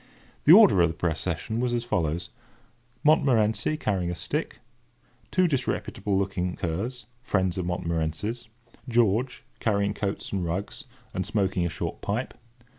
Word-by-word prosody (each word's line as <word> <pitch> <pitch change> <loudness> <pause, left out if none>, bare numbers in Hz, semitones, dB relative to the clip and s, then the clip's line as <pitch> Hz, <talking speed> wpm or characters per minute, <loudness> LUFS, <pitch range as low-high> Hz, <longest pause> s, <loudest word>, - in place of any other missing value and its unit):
The 150 - +8
order 195 - +8
of 85 - +5
the 80 - -5
procession 85 +6 -2
was 125 0 0
as 120 - -1
follows:— 85 -6 -1 0.7
Montmorency, 125 -4 +3
carrying 95 - -1
a 90 - -3
stick. 140 - -3 0.7
Two 185 -1 +3
disreputable 125 - -1
looking 90 -2 -1
curs, 105 +10 -3 0.2
friends 95 -7 0
of 90 - -2
Montmorency's. 85 +7 -2 0.4
George, 120 +2 +1 0.2
carrying 100 -2 +1
coats 100 -1 -3
and 95 -2 -1
rugs, 90 +4 -4 0.3
and 95 - -1
smoking 95 -2 0
a - - -3
short 80 - -5
pipe. - - -2
100 Hz, 135 wpm, -26 LUFS, 90-120 Hz, 0.7 s, The